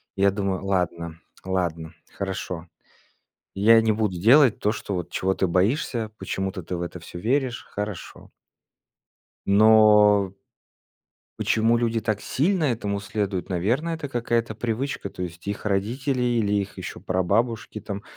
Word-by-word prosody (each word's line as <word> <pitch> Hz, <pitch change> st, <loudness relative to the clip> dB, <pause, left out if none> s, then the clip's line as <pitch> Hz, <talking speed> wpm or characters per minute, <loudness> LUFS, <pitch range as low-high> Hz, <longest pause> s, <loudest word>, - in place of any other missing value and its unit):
Я 100 Hz, 0 st, +3 dB
думаю: 100 Hz, -1 st, -2 dB
"Ладно, 85 Hz, -3 st, -2 dB, 0.3 s
ладно, 85 Hz, -3 st, -2 dB, 0.2 s
хорошо, 90 Hz, -3 st, -5 dB, 0.9 s
я 115 Hz, +3 st, +6 dB
не 110 Hz, -, +2 dB
буду 105 Hz, -4 st, -1 dB
делать 125 Hz, -, +6 dB
то, 105 Hz, -, +2 dB
что 100 Hz, -2 st, -5 dB
вот 90 Hz, -3 st, -4 dB
чего 95 Hz, +1 st, 0 dB
ты 95 Hz, -, 0 dB
боишься, 110 Hz, -, 0 dB
почему-то 95 Hz, -1 st, -3 dB
ты 90 Hz, +2 st, -4 dB
в -, -, -5 dB
это 85 Hz, 0 st, -6 dB
всё 85 Hz, -, -9 dB
веришь, 125 Hz, +3 st, 0 dB
хорошо". 105 Hz, -2 st, -6 dB, 1.2 s
Но 105 Hz, -1 st, +6 dB, 1.1 s
почему 115 Hz, +2 st, +2 dB
люди 115 Hz, -1 st, 0 dB
так 110 Hz, -2 st, -1 dB
сильно 170 Hz, +4 st, 0 dB
этому 105 Hz, -7 st, -1 dB
следуют? 100 Hz, -3 st, -3 dB
Наверное, 120 Hz, -, 0 dB
это 155 Hz, -3 st, -5 dB
какая-то 120 Hz, -2 st, -1 dB
привычка, 115 Hz, 0 st, -3 dB
то 90 Hz, -, -7 dB
есть 85 Hz, 0 st, -7 dB
их 100 Hz, -, -4 dB
родители 120 Hz, +7 st, -1 dB
или 115 Hz, -4 st, +1 dB
их 100 Hz, -1 st, -1 dB
еще -, -, -7 dB
прабабушки 110 Hz, +5 st, -1 dB
там. 100 Hz, 0 st, -6 dB
105 Hz, 140 wpm, -24 LUFS, 95-115 Hz, 1.2 s, я